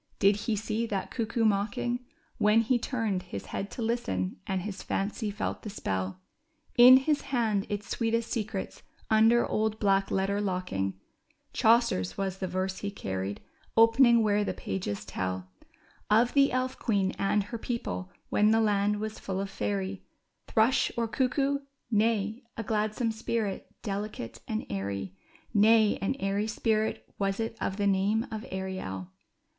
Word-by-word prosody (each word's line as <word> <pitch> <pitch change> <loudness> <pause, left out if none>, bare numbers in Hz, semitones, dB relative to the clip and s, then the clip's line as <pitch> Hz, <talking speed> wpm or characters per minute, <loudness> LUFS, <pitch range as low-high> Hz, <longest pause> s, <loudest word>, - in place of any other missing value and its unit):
did 200 +1 +5
he 215 +2 -1
see 220 +2 -2
that 200 -3 -3
cuckoo 230 -1 0
mocking 220 +4 0 0.4
When 210 +2 +5
he 240 +2 +2
turned 225 -7 -1
his 100 - -7
head 200 - -4
to 235 - -5
listen 95 - -1
and 190 -2 -1
his 205 -1 -5
fancy 210 +2 -2
felt 205 +1 -3
the 215 - -6
spell? 95 - -3 0.6
In 250 +1 +10
his 290 +2 +1
hand 230 -7 0
— - - -26
its 205 0 -3
sweetest 230 0 0
secrets 215 -4 -3 0.3
un 220 +1 +6
der 240 0 +4
old 215 0 0
black 195 -2 +2
letter 195 +1 0
locking 180 - -2 0.3
— - - -40
Chaucer's 220 - +3
was 195 -1 -2
the 185 - -2
verse 185 +1 -2
he 205 - -3
carried, 95 - -4 0.4
opening 230 +1 +6
where 210 -1 +2
the - - -2
pages 100 +1 -4
tell 95 -1 -4 0.6
Of 230 +3 +4
the 280 -1 +5
elf 255 0 -1
queen 200 -4 +1
and 200 +1 +2
her 225 +3 -6
people 90 - -4 0.2
when 210 +1 +4
the 225 +1 +4
land 210 -1 +2
was 215 0 -4
full 190 -1 -3
of 195 0 -3
fairy. 95 - -2 0.5
Thrush, 225 +4 +3
or 230 -1 +1
cuc 255 +3 0
koo? 280 -1 +1 0.3
Nay, 215 +1 +1 0.2
a 225 - -2
gladsome 215 +2 0
spirit, 220 -2 -3
delicate 205 - -4
and 220 0 -2
airy; 100 -1 -4 0.4
Nay, 220 0 +5
an 195 +7 0
airy 200 -3 -1
spirit 220 0 0
was 195 0 0
it 225 0 -2
of 190 - -2
the 205 - 0
name 200 +4 +2
of 220 -1 -4
Ariel 185 - -5
210 Hz, 160 wpm, -29 LUFS, 190-225 Hz, 0.6 s, In